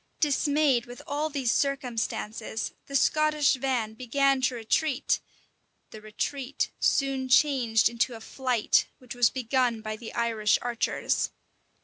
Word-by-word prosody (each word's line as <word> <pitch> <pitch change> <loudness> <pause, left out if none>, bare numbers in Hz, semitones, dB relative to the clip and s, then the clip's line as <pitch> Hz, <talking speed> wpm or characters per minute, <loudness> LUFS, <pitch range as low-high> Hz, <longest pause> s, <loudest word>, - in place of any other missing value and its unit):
Dismayed 290 -4 +2
with 245 0 -10
all 295 +2 -2
these 270 -5 0
circumstances, 230 -5 -2
the 275 - -6
Scottish 305 +1 +3
van 255 -5 -1
began 270 +3 +1
to 260 -1 +1
retreat: 255 +5 0 0.7
the 215 - -10
retreat 255 +5 -3
soon 270 -2 +1
changed 250 -5 +4
into 235 +1 -1
a - - -9
flight, 250 -1 +1
which 250 -2 -10
was 245 -2 +4
begun 250 -2 0
by 215 0 -4
the 225 0 -9
Irish 225 -3 +2
archers. 240 -1 -1
255 Hz, 125 wpm, -27 LUFS, 230-275 Hz, 0.7 s, changed